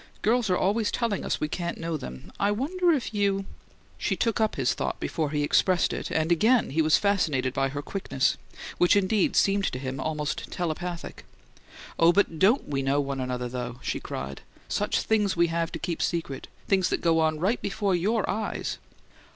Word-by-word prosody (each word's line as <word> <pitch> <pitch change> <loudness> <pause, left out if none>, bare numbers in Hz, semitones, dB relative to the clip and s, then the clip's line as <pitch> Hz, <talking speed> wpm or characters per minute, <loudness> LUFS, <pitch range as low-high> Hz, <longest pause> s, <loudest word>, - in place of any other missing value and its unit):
"Girls 230 -1 +2
are 180 - +3
always 210 +3 +1
telling 230 -5 -1
us - - -1
we 150 - 0
can't 170 +2 -3
know 165 0 -3
them. 65 - -8
I 200 - +2
wonder 335 - +1
if 270 -7 -1
you 200 -1 +1 0.3
" - - -31
She - - 0
took 230 -1 0
up 220 - +1
his 130 -3 +1
thought - - -3
before 155 -3 -2
he 145 0 0
expressed 180 +4 +3
it, - - -4
and 160 +1 0
again 220 - +3
he 160 +4 +2
was 155 0 +4
fascinated 150 -11 +1
by 135 0 +1
her 145 +1 -5
quickness, 165 -9 0 0.4
which 175 - +5
indeed 200 0 +2
seemed 200 0 +3
to 125 - -2
him 130 0 -4
almost 150 +1 -3
telepathic. 175 0 -4 0.8
"Oh, 165 +1 +7
but 175 -4 +1
DON'T 220 +8 +4
we 140 -2 -1
know 135 +1 +1
one 140 -1 -2
another, 125 -1 -2
though!" 125 0 -5
she - - -2
cried. 70 +1 -6 0.3
"Such - - 0
things 210 -4 +1
we 170 0 +4
have 165 0 -1
to - - -4
keep 170 -2 -3
secret 165 -6 -2 0.2
things 190 -2 +2
that - - -1
go 165 -1 +3
on 155 -1 +1
right 200 +9 +1
before 200 -1 -1
YOUR 205 +5 +1
eyes!" 215 +2 -3
170 Hz, 195 wpm, -27 LUFS, 145-205 Hz, 0.8 s, Oh